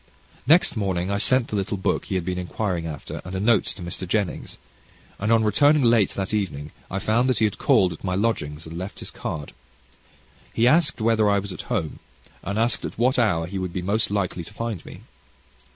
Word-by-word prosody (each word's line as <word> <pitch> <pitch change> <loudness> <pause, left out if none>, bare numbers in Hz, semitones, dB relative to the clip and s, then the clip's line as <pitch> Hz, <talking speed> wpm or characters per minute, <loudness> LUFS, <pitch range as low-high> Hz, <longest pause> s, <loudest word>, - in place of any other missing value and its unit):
Next 165 -1 +5
morning 95 -3 -1
I 100 - 0
sent 130 +2 +2
the - - -3
little 100 +1 -1
book 95 - -1
he 95 - -3
had 90 -2 -1
been 90 0 -2
inquiring 90 -1 -2
after, 75 -2 -6
and 90 +2 -7
a - - -1
note 110 0 +3
to 95 - -5
Mr. 85 +1 -4
Jennings, 100 0 -2 0.6
and 105 +3 0
on 115 -1 +5
returning 145 +7 +4
late 115 -4 +4
that 95 +1 -3
evening, 75 -8 -2 0.2
I 95 - -3
found 115 +6 +2
that 130 - +1
he 110 - +3
had 105 - -2
called 90 -2 +3
at 80 - -13
my 90 -1 -1
lodgings, 80 -8 -1
and 85 +1 -7
left 95 +2 -6
his - - -7
card. 75 -2 -5 1.0
He 115 +1 +4
asked 155 -2 +3
whether 110 -1 +3
I 100 - +3
was 100 -1 -3
at - - -9
home, 80 - -2 0.4
and 100 +3 -3
asked 115 +2 +1
at - - -5
what 125 +3 +2
hour 85 -8 +2
he 95 +3 -4
would 90 -2 -4
be 90 - -3
most 105 +4 0
likely 95 -4 -1
to 105 - -12
find 115 -5 -4
me. - - -11
100 Hz, 215 wpm, -24 LUFS, 90-115 Hz, 1.0 s, Next